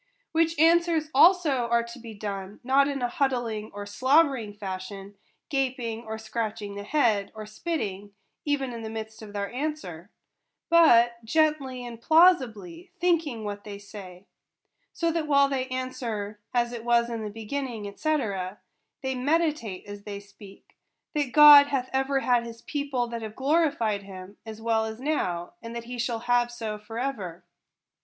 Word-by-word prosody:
Which 330 0 +1
answers 330 -1 +3
also 295 -5 +5
are 235 0 +2
to 235 +2 -10
be 225 -2 -10
done, 200 -1 -6
not 270 +2 +4
in 275 -3 -3
a - - +2
huddling 240 -5 -1
or 205 0 -7
slubbering 260 -1 +2
fashion 195 0 -6 0.2
— - - -47
gaping 250 -4 -2
or 220 0 -5
scratching 220 -2 -4
the 200 - -6
head, 220 -6 +1
or 215 0 -7
spitting, 210 - -4 0.3
even 275 -4 -1
in 230 - -6
the 220 - -5
midst 220 0 -7
of 215 -2 -10
their 200 -1 -4
answer 250 - -4 0.3
— - - -56
but 240 -8 +5
gently 270 -1 +1
and 235 -1 -9
plausibly, 330 - +3
thinking 330 -10 +1
what 205 -1 -5
they 205 -1 -7
say; 200 -2 -11 0.7
so 335 -1 0
that 325 -2 -2
while 280 -1 +5
they 265 -2 -2
answer 235 -5 -4
" - - -54
As 240 -1 0
it 235 -2 -6
was 235 0 +3
in 230 -1 -4
the 210 - -4
beginning," 225 -1 -5
&c. 310 0 +1 0.9
they 265 0 -1
meditate 280 - 0
as 205 0 -9
they 200 -1 -7
speak, 200 0 -16 0.4
that 290 -5 -1
God 295 -1 +10
hath 265 -3 -2
ever 270 +1 +1
had 245 -2 +2
his 230 0 -10
people 280 -4 -2
that 235 -1 -5
have 220 -1 -7
glorified 270 -8 +1
him, 195 0 -11
as 220 0 -7
well 225 0 +1
as 220 +1 -6
now, 185 - -2
and 230 0 -8
that 235 - -4
he 245 +1 -7
shall 235 -1 -1
have 240 0 +2
so 220 -3 -5
for 225 +2 -9
ever. 205 -10 -4
235 Hz, 170 wpm, -26 LUFS, 210-280 Hz, 0.9 s, God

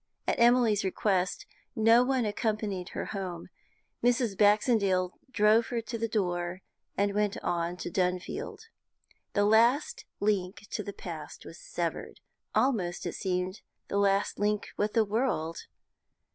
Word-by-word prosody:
At - - 0
Emily's 235 -3 +4
request 190 -1 0 0.3
no 225 +2 +5
one 255 -2 +1
accompanied 210 -3 -2
her - - -4
home. 185 -4 -5 0.5
Mrs. 240 -4 +2
Baxendale 205 -3 +3
drove 220 -1 +4
her 240 - -2
to 230 +1 -6
the 230 0 -1
door, 180 -4 -2 0.3
and 200 0 +1
went 210 -1 0
on 170 +1 -1
to 175 - -5
Dunfield. 180 - -2 0.7
The 205 -1 +3
last 240 - +3
link 200 -1 -1
with 210 - -4
the - - -2
past - - -8
was - - -10
severed - - -4 0.4
almost, 195 -10 +1
it - - -3
seemed, 185 0 -2 0.3
the 200 - 0
last 200 0 +1
link 210 0 0
with 210 +1 -1
the 225 -2 +3
world. 200 -7 -1
205 Hz, 135 wpm, -29 LUFS, 185-225 Hz, 0.7 s, no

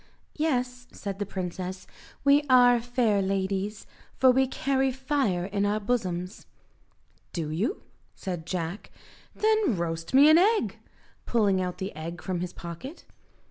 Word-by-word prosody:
"Yes," 250 -5 -1
said 200 -1 -6
the 205 - -2
princess, 185 0 -5 0.4
"we 280 +1 +5
are 245 -1 +6
fair 235 -4 +1
ladies, 195 +1 -2 0.3
for 260 -1 +6
we 265 +1 +3
carry 270 0 0
fire 260 -9 0
in 200 +1 -1
our 205 +1 +1
bosoms." 190 -4 -3 0.9
"Do 160 -3 -3
you?" 215 - -2 0.3
said 175 -4 -5
Jack, 175 +2 -4 0.5
"then 430 - +2
roast 165 +5 -3
me 280 +2 +8
an 315 +2 +7
egg," 425 +4 +2 0.5
pulling 205 -5 +2
out 180 -1 -3
the 190 -2 -5
egg 165 +2 -6
from 185 -2 -2
his 180 0 -4
pocket. 175 - -9
205 Hz, 140 wpm, -27 LUFS, 180-260 Hz, 0.9 s, me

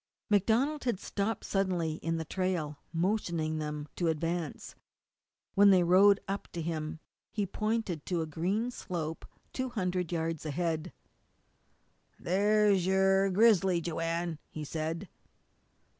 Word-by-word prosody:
MacDonald 235 +9 +2
had 235 -7 0
stopped 205 +2 -2
suddenly 180 -5 0
in 165 0 -2
the 160 - -3
trail, 170 -4 -2
motioning 170 -3 0
them 150 -1 -4
to 175 - +1
advance. 165 0 -2 0.8
When 200 +1 +7
they 185 -2 +6
rode 195 +3 +6
up 195 0 -3
to 170 - -3
him 155 -1 -3 0.3
he 205 -2 -1
pointed 215 -5 -2
to 175 -3 0
a - - -3
green 190 +10 -1
slope 160 -8 -5 0.3
two 260 0 -2
hundred 180 -6 -2
yards 165 -2 -2
ahead. 160 +2 -2 1.3
"There's 200 0 +3
yo'r 190 0 +4
grizzly, 195 -3 +4
Joanne," 165 0 -2
he 155 - -6
said. 160 +5 -3
180 Hz, 125 wpm, -31 LUFS, 160-200 Hz, 1.3 s, When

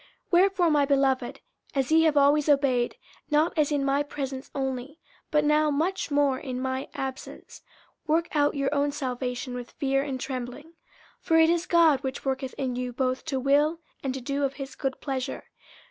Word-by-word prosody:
50:002:012 - - -26 0.2
Wherefore, 365 -1 +4
my 290 -2 +4
beloved, 270 -3 +1 0.3
as 270 +1 0
ye 320 0 +6
have 305 -2 +3
always 285 +1 +4
obeyed, 270 -4 +2 0.3
not 305 +3 +2
as 305 -2 +2
in 285 -2 +1
my 275 +1 +2
presence 270 -2 -5
only, 265 +2 -3 0.3
but 300 -1 +2
now 300 +1 +3
much 325 +7 -1
more 285 -2 +2
in 255 -3 -5
my 260 +1 -3
absence, 265 -1 -7 0.5
work 325 +2 +2
out 290 0 +2
your 275 0 0
own 285 0 +1
salvation 255 -3 -4
with 245 -1 -6
fear 275 -1 0
and 275 -2 -4
trembling. 255 +4 -6
50:002:013 - - -24 0.5
For 325 - +1
it 320 0 +6
is 345 0 0
God 325 -5 +4
which 265 0 -5
worketh 265 -1 -2
in 255 -2 -2
you 250 0 -3
both 255 +1 -1
to 275 -5 -1
will 290 +5 +2 0.2
and 270 - -2
to 265 - -5
do 280 +3 -2
of 275 0 -1
his 275 -1 -7
good 270 -2 -3
pleasure. 265 -1 -3
275 Hz, 190 wpm, -26 LUFS, 260-300 Hz, 0.5 s, ye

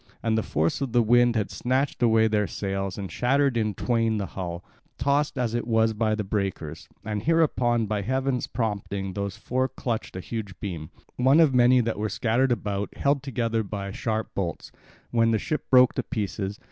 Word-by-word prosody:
And 115 -1 +1
the 110 - +2
force 80 - -1
of 135 -4 -2
the 120 -1 +4
wind 120 +1 +4
had 105 -3 -1
snatched 130 +3 -1
away 110 -2 +4
their 105 -2 +1
sails 95 -1 -3
and 95 -4 -5
shattered 135 +5 +2
in 110 -3 0
twain 115 -1 +1
the 100 - -2
hull, 90 -2 -6 0.3
tossed 140 +3 +1
as 120 -3 0
it 120 -1 -2
was 110 -1 +3
by 110 0 +1
the 105 - -2
breakers. 95 -6 -3 0.2
And 105 -2 -2
hereupon 125 -6 +2
by 105 -1 -1
heaven's 130 +3 -1
prompting 100 -4 -3
those 100 +1 -4
four 130 +3 -1
clutched 115 -7 -4
a - - -3
huge 100 0 -6
beam, 85 -6 -5 0.3
one 130 +5 +5
of 155 -5 +5
many 125 0 +5
that 115 -2 -2
were 110 +1 -1
scattered 120 +5 +1
about, 100 -3 -2
held 140 0 +2
together 115 -4 -1
by 100 -1 -5
sharp 110 +1 -3
bolts, 85 -5 -4 0.4
when 115 -1 +3
the 115 - +3
ship 150 +8 -3
broke 125 -1 +6
to - - -1
pieces. 100 -3 -4
110 Hz, 190 wpm, -26 LUFS, 100-125 Hz, 0.4 s, broke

